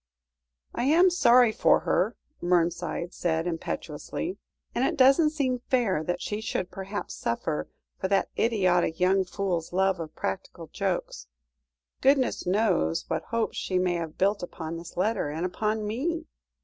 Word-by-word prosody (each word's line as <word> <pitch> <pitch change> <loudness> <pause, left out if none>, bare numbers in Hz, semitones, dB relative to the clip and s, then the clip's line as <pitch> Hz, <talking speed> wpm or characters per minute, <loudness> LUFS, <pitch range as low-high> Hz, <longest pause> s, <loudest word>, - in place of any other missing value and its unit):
"I 240 - -1
am 345 +6 +5
sorry 245 -9 +5
for - - +3
her," - - +1 0.3
Mernside 175 0 0
said 165 -1 -1
impetuously, 175 - -4 0.3
"and 245 - 0
it 310 +4 0
doesn't 275 +4 +6
seem 270 -5 -1
fair 220 -11 +2
that 175 +2 -2
she 210 +1 -3
should 185 -4 -3
perhaps 195 +2 -5
suffer 135 +6 -2 0.3
for 190 - -1
that 195 0 +1
idiotic 185 -7 +2
young 190 +1 +3
fool's 180 -3 -2
love 190 0 +2
of 160 -2 -7
practical 175 -3 -4
jokes. 185 - -2 0.7
Goodness 270 -7 +2
knows 185 -4 +1
what 160 - -1
hopes 230 -1 -2
she 185 - -1
may 180 -1 +2
have 165 -2 -4
built 200 +2 +2
upon 165 -2 -6
this 170 +1 -10
letter, 200 -4 0
and 160 +4 -3
upon 215 +4 -1
me. 320 +10 -2
190 Hz, 150 wpm, -27 LUFS, 175-235 Hz, 0.7 s, doesn't